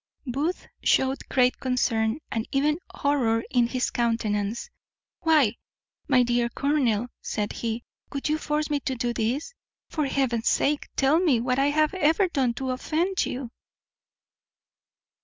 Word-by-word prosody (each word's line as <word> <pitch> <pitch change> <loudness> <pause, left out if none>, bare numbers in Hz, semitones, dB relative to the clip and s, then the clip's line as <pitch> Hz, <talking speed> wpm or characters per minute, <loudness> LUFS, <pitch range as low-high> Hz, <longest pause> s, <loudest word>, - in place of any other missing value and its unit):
Booth 285 +8 -2 0.2
shewed 265 +1 +1
great 250 -1 +3
concern, 235 -3 +1
and 225 0 -2
even 300 +3 +2
horror 245 -6 +1
in 245 -2 +3
his 250 +1 -1
countenance. 230 - -1 0.5
"Why, 300 -9 +3 0.5
my 255 -4 +5
dear 240 0 +1
colonel," 250 -5 +1 0.2
said 210 -1 -3
he, 230 +1 -3 0.3
"would 280 -1 -3
you 305 +1 +1
force 300 0 -1
me 290 - +2
to 265 -1 -3 0.2
this? 250 - -2 0.4
for 305 -3 0
Heaven's 255 -5 +1
sake 290 +1 +1
tell 280 +4 +4
me 310 -10 +3
what 250 +2 0
I 275 - +3
have 305 +3 +2
ever 370 +1 +3
done 260 -8 0
to 260 +1 -2
offend 330 +9 0
you." 250 -2 -5
265 Hz, 140 wpm, -26 LUFS, 235-300 Hz, 0.5 s, my